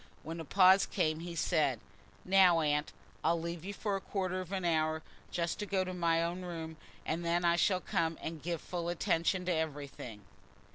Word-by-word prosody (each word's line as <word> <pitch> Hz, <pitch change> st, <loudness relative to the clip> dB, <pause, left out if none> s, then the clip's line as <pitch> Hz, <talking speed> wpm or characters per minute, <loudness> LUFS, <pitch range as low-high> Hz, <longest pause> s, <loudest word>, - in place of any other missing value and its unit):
When 165 Hz, +2 st, -6 dB
a 165 Hz, -, -5 dB
pause 190 Hz, +4 st, +6 dB
came, 160 Hz, -5 st, 0 dB
he 170 Hz, 0 st, -6 dB
said: 150 Hz, -8 st, +1 dB, 0.5 s
"Now, 185 Hz, -3 st, +6 dB
Aunt, 150 Hz, -1 st, +1 dB, 0.3 s
I'll 165 Hz, +1 st, +2 dB
leave 170 Hz, 0 st, -5 dB
you 195 Hz, -, -4 dB
for 205 Hz, 0 st, -2 dB
a 195 Hz, -, -3 dB
quarter 185 Hz, -2 st, -2 dB
of 185 Hz, 0 st, -9 dB
an 190 Hz, -2 st, -2 dB
hour 160 Hz, -1 st, +1 dB, 0.3 s
just 170 Hz, -1 st, -2 dB
to 210 Hz, -, -3 dB
go 190 Hz, -2 st, +1 dB
to 185 Hz, 0 st, -5 dB
my 165 Hz, -2 st, +2 dB
own 175 Hz, +2 st, -2 dB
room, 165 Hz, -3 st, -6 dB, 0.3 s
and 165 Hz, +2 st, -2 dB
then 170 Hz, +1 st, +1 dB
I 170 Hz, 0 st, +4 dB
shall 185 Hz, +1 st, +2 dB
come 165 Hz, -1 st, -1 dB
and 160 Hz, -1 st, -6 dB
give 170 Hz, 0 st, -3 dB
full 170 Hz, -1 st, -4 dB
attention 175 Hz, +1 st, +1 dB
to 180 Hz, -, +1 dB
everything." 140 Hz, -9 st, -4 dB
170 Hz, 195 wpm, -33 LUFS, 160-185 Hz, 0.5 s, pause